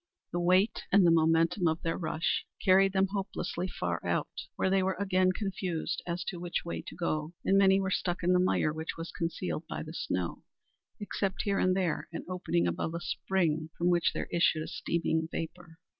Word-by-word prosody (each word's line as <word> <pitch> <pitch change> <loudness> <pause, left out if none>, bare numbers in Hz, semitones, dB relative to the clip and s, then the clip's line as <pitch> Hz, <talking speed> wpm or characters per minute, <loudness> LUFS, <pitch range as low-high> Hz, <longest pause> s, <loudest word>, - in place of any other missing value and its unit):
Their 175 - -1
weight 185 +5 +3
and 195 -1 +6
the 170 - +6
momentum 165 +2 +3
of 160 +1 -1
their 165 - 0
rush 160 -1 -1
carried 195 0 +5
them 190 0 +3
hopelessly 195 -2 -3
far 85 - -3
out, - - -1 0.2
where 190 - +1
they 195 0 +4
were 190 0 0
again 185 -2 +3
confused 185 -4 -3
as 170 0 -2
to 180 -1 -5
which 175 0 -3
way 170 - -3
to - - -7
go, 155 -1 -2
and 195 - +4
many 195 0 +5
were 190 -1 -1
stuck 180 -1 -1
in 180 +1 +4
the 180 - +4
mire 180 -4 +2
which 160 +1 -5
was 165 0 -6
concealed 165 - -3
by - - -4
the - - -8
snow, 90 -2 -2 0.6
except 200 -2 -2
here 200 -1 +1
and 185 0 +3
there 180 -5 -1
an 165 - -6
opening 175 - 0
above 90 - -2
a - - -2
spring 165 -3 -1
from 175 +1 +2
which 175 -1 +3
there - - -4
issued 170 -2 +2
a - - -7
steaming 160 -1 -1
vapor. 165 0 -6
175 Hz, 200 wpm, -30 LUFS, 165-190 Hz, 0.6 s, and